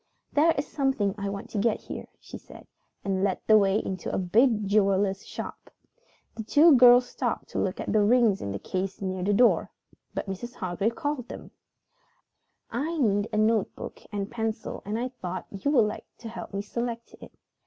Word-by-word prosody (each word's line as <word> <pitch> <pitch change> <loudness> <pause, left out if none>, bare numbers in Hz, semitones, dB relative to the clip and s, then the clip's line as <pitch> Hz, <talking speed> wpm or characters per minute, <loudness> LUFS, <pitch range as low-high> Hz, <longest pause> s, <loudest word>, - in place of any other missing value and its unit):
"There 310 +3 +5
is 280 - 0
something 265 -9 0
I 200 0 -2
want 200 0 -6
to 210 - -2
get 220 +1 +1
here," - - -7
she - - -11
said, - - -14 0.4
and 190 -1 0
led 195 -2 +1
the 220 - +6
way 200 -1 +4
into 190 -4 -4
a - - -1
big 215 +3 +2
jeweler's 195 -1 +2
shop. - - -7 0.6
The - - -6
two 290 +9 +6
girls 245 0 +7
stopped - - -3
to - - -3
look - - -1
at - - -3
the 215 - +4
rings 220 -2 +4
in 100 - -4
the 100 - -3
case 185 - -4
near 185 -1 -3
the 195 +3 +1
door, 235 +4 +4 0.5
but - - -2
Mrs. 215 +6 -6
Hargrave 195 +5 -2
called 290 -6 -3
them. - - -9 1.2
"I 325 +4 -2
need 205 -6 +2
a - - -1
notebook 215 -1 0
and 205 0 -4
pencil 225 -2 -3
and 210 +2 -2
I 250 +2 -2
thought 185 -8 -6
you 200 +8 -2
would 250 -7 +5
like 210 - -5
to 230 - -8
help 225 - -8
me 200 0 -3
select 235 +2 -4
it. - - -11
215 Hz, 190 wpm, -27 LUFS, 195-245 Hz, 1.2 s, girls